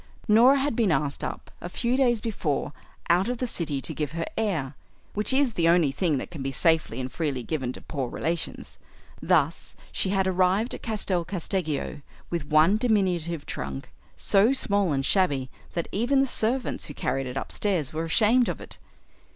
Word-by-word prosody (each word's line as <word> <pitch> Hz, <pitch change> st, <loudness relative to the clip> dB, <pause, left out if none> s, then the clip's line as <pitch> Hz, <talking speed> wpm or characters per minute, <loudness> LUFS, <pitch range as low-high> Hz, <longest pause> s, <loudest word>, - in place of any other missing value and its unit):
Norah 240 Hz, +6 st, +6 dB
had 275 Hz, -2 st, 0 dB
been 220 Hz, -6 st, +2 dB
asked 145 Hz, -1 st, -1 dB
up -, -, -6 dB
a 175 Hz, -, -5 dB
few 240 Hz, +6 st, 0 dB
days 245 Hz, -4 st, +2 dB
before 165 Hz, -10 st, -2 dB, 0.3 s
out 180 Hz, +6 st, +3 dB
of 245 Hz, -, -2 dB
the 250 Hz, -, -2 dB
City 160 Hz, -, -1 dB
to 160 Hz, -, +3 dB
give 150 Hz, 0 st, -3 dB
her 165 Hz, 0 st, -2 dB
air 170 Hz, -12 st, -1 dB, 0.4 s
which 210 Hz, +4 st, +1 dB
is 265 Hz, -2 st, +2 dB
the 165 Hz, -3 st, +2 dB
only 170 Hz, -5 st, +4 dB
thing 155 Hz, +1 st, 0 dB
that 130 Hz, -, -6 dB
can 160 Hz, -5 st, -7 dB
be 135 Hz, -, -2 dB
safely 155 Hz, -3 st, +1 dB
and 130 Hz, 0 st, -4 dB
freely 140 Hz, -6 st, -2 dB
given 130 Hz, -3 st, -2 dB
to -, -, -9 dB
poor 135 Hz, -5 st, -4 dB
relations. 165 Hz, +6 st, -4 dB, 0.4 s
Thus -, -, +1 dB, 0.2 s
she 190 Hz, -, 0 dB
had 190 Hz, -1 st, +1 dB
arrived 190 Hz, +5 st, +2 dB
at -, -, -7 dB
Castel 200 Hz, -6 st, 0 dB
Casteggio 170 Hz, -5 st, -3 dB, 0.3 s
with 170 Hz, -4 st, -3 dB
one 155 Hz, +7 st, +4 dB
diminutive 180 Hz, -9 st, 0 dB
trunk, 65 Hz, 0 st, -6 dB, 0.2 s
so 205 Hz, +6 st, +3 dB
small 200 Hz, -, +1 dB
and 135 Hz, -1 st, 0 dB
shabby 140 Hz, -10 st, +1 dB, 0.2 s
that 170 Hz, -, -2 dB
even 245 Hz, +7 st, +2 dB
the 270 Hz, -, +4 dB
servants 250 Hz, 0 st, -1 dB
who 145 Hz, -, -8 dB
carried 135 Hz, -1 st, -2 dB
it 125 Hz, +1 st, -5 dB
upstairs 170 Hz, -2 st, -1 dB
were 160 Hz, +1 st, -2 dB
ashamed 225 Hz, +8 st, +4 dB
of -, -, -4 dB
it. -, -, -9 dB
175 Hz, 185 wpm, -26 LUFS, 150-215 Hz, 0.4 s, Norah